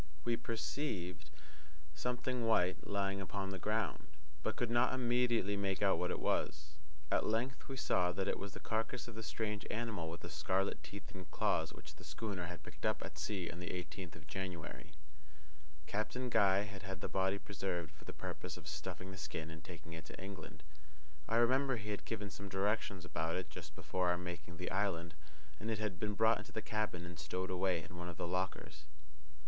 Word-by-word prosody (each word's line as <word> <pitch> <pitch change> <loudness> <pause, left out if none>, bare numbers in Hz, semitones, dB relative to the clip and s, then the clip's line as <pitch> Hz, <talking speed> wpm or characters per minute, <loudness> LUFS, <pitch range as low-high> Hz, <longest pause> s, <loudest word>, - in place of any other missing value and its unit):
We 120 - +4
perceived 110 - -2 0.6
something 125 +6 0
white 90 -5 +4
lying 100 -1 +1
upon 95 +1 -2
the 95 - -3
ground, 105 -6 +1 0.3
but 110 +6 0
could 120 -1 +1
not 120 +2 +5
immediately 120 -5 +3
make 100 -1 +1
out - - +5
what - - +2
it - - 0
was. 75 0 +1 0.4
At - - +4
length 120 +4 +1
we 135 - -4
saw 90 -7 +4
that 95 +1 0
it - - +1
was 100 - -4
the - - -6
carcass 115 +3 0
of 120 - -6
the 110 - -4
strange 105 -1 -1
animal 110 -7 -1
with 85 - -5
the 85 - -5
scarlet 95 +4 +1
teeth 90 +6 -8
and 95 -5 -7
claws - - +2
which - - -10
the - - -11
schooner 100 -6 -2
had 85 -3 -6
picked - - -11
up - - +2
at - - -7
sea 95 -5 0
on 85 - -7
the 90 - -3
eighteenth 90 -1 -4
of - - -11
January. 90 -4 -4 0.9
Captain 120 +7 -1
Guy 100 -3 +6
had 100 -1 -6
had 95 0 -4
the - - 0
body 95 +1 +3
preserved 90 -5 -2
for 80 - -16
the - - -4
purpose - - -4
of - - -9
stuffing 95 +1 -4
the 95 - -7
skin 80 -1 -3
and 80 0 -8
taking 80 -1 -8
it 80 0 -6
to - - -8
England. 90 -5 -7 0.7
I 115 - +3
remember 130 +3 +5
he 105 -2 -3
had 105 - -3
given 105 -3 -2
some 100 +1 -6
directions 95 -1 +1
about 80 -2 0
it 95 - -2
just 80 -4 -7
before 90 +4 +1
our 90 - +4
making 85 -1 -5
the 90 - -2
island, 90 -4 +1 0.5
and 110 - -2
it 110 - +2
had 105 -5 -1
been 105 +2 +1
brought 110 +1 +6
into 105 - -9
the 110 - -2
cabin 105 -5 0
and 85 -1 -7
stowed 90 +5 -1
away 90 -2 +2
in 90 - -9
one 85 0 -3
of 85 - -7
the - - 0
lockers. 90 -3 -1
95 Hz, 200 wpm, -38 LUFS, 85-110 Hz, 0.9 s, Guy